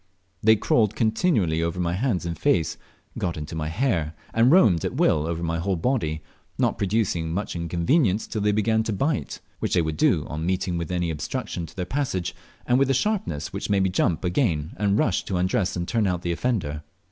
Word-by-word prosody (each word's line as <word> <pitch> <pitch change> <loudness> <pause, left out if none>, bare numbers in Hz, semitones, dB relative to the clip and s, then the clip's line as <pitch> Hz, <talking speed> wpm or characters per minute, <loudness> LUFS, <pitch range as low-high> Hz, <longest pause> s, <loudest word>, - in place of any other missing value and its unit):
They 110 +1 +6
crawled 110 0 +2
continually 110 - +1
over 85 +2 -2
my 85 -1 0
hands 100 -3 0
and 85 -1 -3
face, 90 - +1 0.4
got 85 -3 -2
into 75 +1 -6
my 75 -1 -2
hair, 85 - 0 0.2
and 115 +3 +4
roamed 105 - +5
at - - -2
will 75 0 +2
over 85 0 -3
my 85 0 -1
whole 95 +3 0
body, 80 - -1 0.3
not - - +1
producing 95 -5 0
much 95 +3 -3
inconvenience 90 - +1
till 110 - -4
they 105 +1 +3
began 110 +1 +2
to 110 - -1
bite, 140 +9 -2 0.2
which - - -1
they 90 - +4
would 80 -1 -3
do - - +3
on 75 +2 -5
meeting 90 0 -1
with 85 0 -4
any 90 -2 0
obstruction 80 +2 -4
to 80 - -16
their 90 - -3
passage, 105 -6 -2 0.3
and 125 +1 +3
with 135 -1 +3
a 135 - +3
sharpness 90 - -1
which - - -4
made 100 -1 +3
me 95 - +2
jump 90 -2 +1
again 90 - 0
and 100 0 +2
rush 100 -5 +1
to 95 - -2
undress 90 +1 0
and 85 -1 -3
turn 110 -4 +1
out 90 -2 -1
the 85 - -1
offender. 85 -7 -1
90 Hz, 205 wpm, -24 LUFS, 85-110 Hz, 0.4 s, They